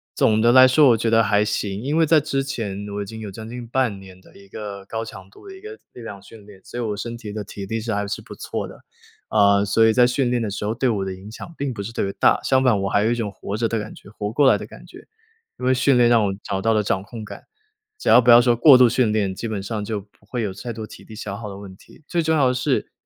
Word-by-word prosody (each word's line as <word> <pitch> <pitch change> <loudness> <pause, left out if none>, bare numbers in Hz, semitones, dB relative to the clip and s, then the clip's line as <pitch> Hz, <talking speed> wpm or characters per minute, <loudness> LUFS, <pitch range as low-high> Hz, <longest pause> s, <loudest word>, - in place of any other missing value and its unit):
总 110 0 +2
的 120 +1 +5
来 130 +1 +8
说 135 +2 +5
我 115 - +4
觉 115 - -1
得 115 0 +4
还 105 -1 +2
行。 105 -1 -3
因 140 +5 -2
为 165 0 +4
在 160 0 +5
之 135 -1 -2
前， 105 -7 -5
我 105 - -3
已 - - -4
经 110 +2 -9
有 105 -2 -7
将 110 +3 -9
近 120 +1 -7
半 120 -3 -1
年 95 -1 -14
的 - - -21
一 100 0 -17
个 100 -1 -7
高 115 +3 -5
强 95 -3 -11
度 105 - -17
的 385 - -10
一 380 - -14
个 435 +1 -10
力 - - -11
量 105 -4 -9
训 105 +1 -15
练， 100 -2 -15
所 - - -9
以 120 - -2
我 105 -2 -3
身 120 +2 -5
体 110 -3 -8
的 105 +1 -5
体 100 0 -8
力 110 +3 -3
是 110 0 -3
还 100 0 -1
是 100 - -5
不 - - -11
错 - - -5
的。 - - -14 0.5
呃， 100 -1 +4
所 105 +3 +3
以 110 - +3
在 125 +2 +5
训 125 +1 0
练 120 -1 0
的 110 - -2
时 100 +1 -5
候 105 - -1
对 130 +1 0
我 100 -4 -1
的 95 - -4
影 95 +3 -12
响 165 +8 -10
并 140 -2 -3
不 105 - -6
是 115 +3 -7
特 - - -1
别 100 - -2
大， - - +2
相 130 -1 +2
反 110 -6 +3
我 95 - -1
还 105 - +2
有 115 - +2
一 - - +1
种 110 -4 -3
活 100 +1 -6
着 115 +1 -1
的 115 - -1
感 105 0 -7
觉 - - -15
活 105 0 -5
过 145 +3 +3
来 - - +3
的 - - -8
感 - - -14
觉。 - - -15 0.5
因 125 - -4
为 130 - +4
训 130 0 +3
练 120 -1 +5
让 120 -2 +4
我 100 - 0
找 95 - -3
到 115 - +1
了 110 -1 +2
掌 95 -2 -1
控 110 +2 -9
感， - - -11 0.5
只 - - -2
要 - - +7
不 125 - +1
要 120 0 +9
说 120 -1 +3
过 130 +3 +7
度 125 -1 +6
训 120 -1 +1
练， 105 -3 0
基 115 - -5
本 105 -3 -4
上 105 +1 -4
就 105 0 -3
不 100 +1 -20
会 120 +1 -3
有 100 -3 -3
太 120 +5 -7
多 110 -1 -6
体 - - -14
力 110 - -12
消 105 -2 -6
耗 105 0 -7
的 100 - -9
问 100 -2 -11
题。 155 - -20
最 175 - 0
重 160 0 +1
要 140 -3 +4
的 - - 0
是 125 - -1
110 Hz, 335 characters per minute, -22 LUFS, 100-125 Hz, 0.5 s, 要